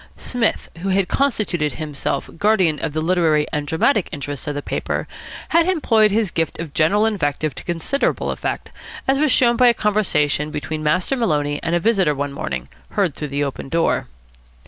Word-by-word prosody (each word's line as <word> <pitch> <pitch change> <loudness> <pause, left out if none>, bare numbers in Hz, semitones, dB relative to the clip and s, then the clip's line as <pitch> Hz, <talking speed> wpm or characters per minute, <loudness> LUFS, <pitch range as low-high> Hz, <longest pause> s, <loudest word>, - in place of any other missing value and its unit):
Psmith, 245 -3 -1
who 195 +3 -3
had 190 -1 +2
constituted 210 - 0
himself 150 -3 -3
guardian 190 -8 +3
of 160 - -2
the 155 0 -1
literary 160 -4 +2
and 150 -1 -2
dramatic 180 - +2
interests 145 -1 -5
of 145 - -2
the 145 - -2
paper, - - -3 0.4
had 335 +2 +3
employed 225 -12 +3
his 210 -2 +1
gift 165 -2 -1
of 165 -4 -6
general 200 +7 +3
invective 155 -8 -1
to - - -8
considerable 175 - -1
effect, - - -4 0.4
as 270 +1 +3
was 305 -2 +3
shown 240 -1 +4
by 250 - +6
a 240 - +5
conversation 155 -9 +1
between 155 +1 -4
Master 180 - +1
Maloney 150 - 0
and 170 - 0
a - - +3
visitor 190 -7 +2
one 140 0 -3
morning, 65 - -4 0.3
heard 190 -7 +1
through 150 - -5
the 140 +1 -1
open 135 -1 -5
door. 165 +2 +1
165 Hz, 180 wpm, -20 LUFS, 150-215 Hz, 0.4 s, by